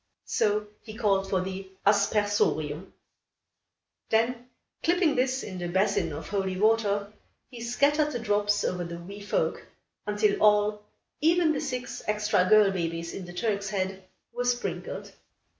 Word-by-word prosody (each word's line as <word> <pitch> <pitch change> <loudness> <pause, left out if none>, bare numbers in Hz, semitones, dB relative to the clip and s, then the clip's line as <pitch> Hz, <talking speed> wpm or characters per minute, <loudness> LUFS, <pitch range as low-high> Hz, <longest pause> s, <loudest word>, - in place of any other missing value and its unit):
So 210 0 +1 0.2
he 215 -2 -10
called 195 -4 +1
for 190 -2 +1
the 190 +1 -6 0.2
"aspersorium." 200 -5 +1 1.2
Then, 235 +2 +1 0.3
clipping 345 -2 +3
this 260 +1 0
in 185 -3 -6
the 175 - -3
basin 190 +4 +1
of - - -6
holy 190 -2 -1
water, 210 -1 +2 0.4
he 240 -2 -9
scattered 290 +6 +2
the 245 - -2
drops 205 -2 +1
over 180 -1 -1
the 170 0 -6
wee 195 +4 -9
folk, 205 - -1 0.4
until 210 0 +1
all, 210 0 +3 0.3
even 325 +1 +3
the 285 - -2
six 250 0 -4
extra 210 -3 +2
girl 210 -2 +6
babies 170 -2 -3
in 190 - -6
the 175 - -10
Turk's 200 +1 -1
Head, 190 -1 -3 0.3
were 245 +1 -2
sprinkled. 245 0 -3
205 Hz, 140 wpm, -27 LUFS, 190-235 Hz, 1.2 s, girl